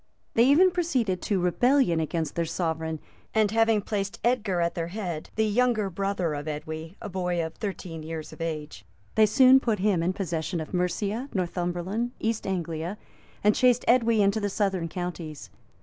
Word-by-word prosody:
They 230 - +5
even 335 +8 +6
proceeded 255 - 0
to 200 -3 0
rebellion 210 +1 +3
against 160 -1 -2
their 170 - 0
sovereign; 160 -1 -2 0.4
and 215 -2 +3
having 225 -2 +3
placed 200 -2 -3
Edgar 230 -7 +1
at 170 0 +1
their 165 -1 -3
head, 175 -4 -5
the 220 - +2
younger 220 -2 +1
brother 190 -3 -1
of 145 +1 -5
Edwy, 155 +3 -5
a - - -6
boy 180 -3 -1
of 160 - -6
thirteen 180 -5 -5
years 160 0 -6
of - - -11
age, 150 - -4 0.3
they 215 -1 +5
soon 260 +4 +7
put 230 -5 0
him 195 -3 +2
in 175 +3 0
possession 170 -2 -2
of 160 - -7
Mercia, 200 +8 -1
Northumberland, 180 +6 -2
East 225 -2 -1
Anglia, 170 0 -3 0.5
and 210 +1 +5
chased 250 0 +3
Edwy 230 -3 +4
into 200 +2 +2
the 205 -1 -1
southern 190 -4 0
counties. 170 -4 -6
190 Hz, 170 wpm, -27 LUFS, 165-220 Hz, 0.5 s, soon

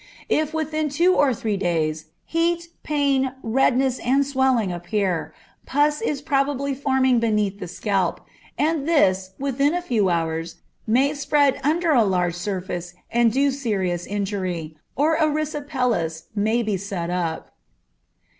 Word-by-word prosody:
If 310 0 +1
within 310 -1 -1
two 345 +6 +3
or 285 -6 +3
three 215 -3 -2
days 160 -4 -1 0.2
heat, 340 +1 0
pain, 275 -3 +1
redness, 260 +2 +2
and 270 +3 +2
swelling 265 -7 +1
appear, 180 0 -2 0.4
pus 295 +2 +2
is 290 -11 -2
probably 280 -1 0
forming 260 -2 +2
beneath 210 -3 0
the 185 - -5
scalp, 190 0 -1 0.4
and 305 -1 0
this, 190 - +2
within 280 +3 +1
a 355 - -1
few 220 - +1
hours, 165 -1 -2 0.3
may 265 +6 +3
spread 285 -1 +2
under 325 +4 +2
a 255 -6 +5
large 180 -3 +1
surface 180 -1 -4 0.2
and 235 -1 +3
do 275 +4 +2
serious 195 -10 -2
injury, 185 -6 -3 0.2
or 310 +3 +2
erysipelas 285 - -1
may 220 +3 +1
be 210 -3 -1
set 180 -3 -4
up. 175 -3 -3
245 Hz, 135 wpm, -23 LUFS, 190-285 Hz, 0.4 s, a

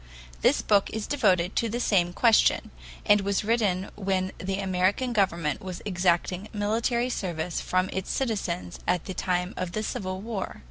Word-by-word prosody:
This - - +3
book 200 -2 +3
is 220 -1 -4
devoted 185 -10 +2
to 230 - +1
the 235 +3 -2
same 180 -7 +2
question, 225 +4 +3 0.3
and 205 0 +5
was 200 +1 0
written 205 -4 +1
when 190 -2 -1
the 190 +1 -2
American 195 +6 0
Government 170 -7 +1
was 185 -2 -6
exacting 180 +1 0
military 230 +4 0
service 175 -5 -3
from 185 0 +1
its 190 0 -3
citizens 195 -9 -2
at 180 -2 +1
the 190 - -4
time 180 0 -1
of 180 -1 -3
the 215 - -2
Civil 185 -2 -3
War. 215 -3 -5
190 Hz, 165 wpm, -27 LUFS, 180-215 Hz, 0.3 s, and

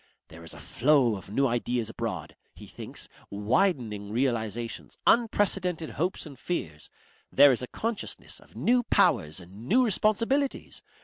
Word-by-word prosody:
There 85 +1 -12
is 80 - -5
a - - -11
flow 130 -4 +3
of 95 -1 -10
new 135 +7 +1
ideas 120 -1 0
abroad, 110 -9 -5 0.2
he - - -11
thinks, - - -8 0.2
widening 110 - 0
realizations, 115 -2 -2
unprecedented 195 -7 +2
hopes 180 +3 -2
and 140 -4 -11
fears. 80 - -4 0.4
There 145 - +7
is 125 - 0
a 125 - -4
consciousness 225 - -4
of - - -21
new 245 +1 +3
powers 75 - +2
and 95 +6 -12
new 250 - +4
responsibilities. 230 +6 +1
125 Hz, 140 wpm, -28 LUFS, -, 0.4 s, There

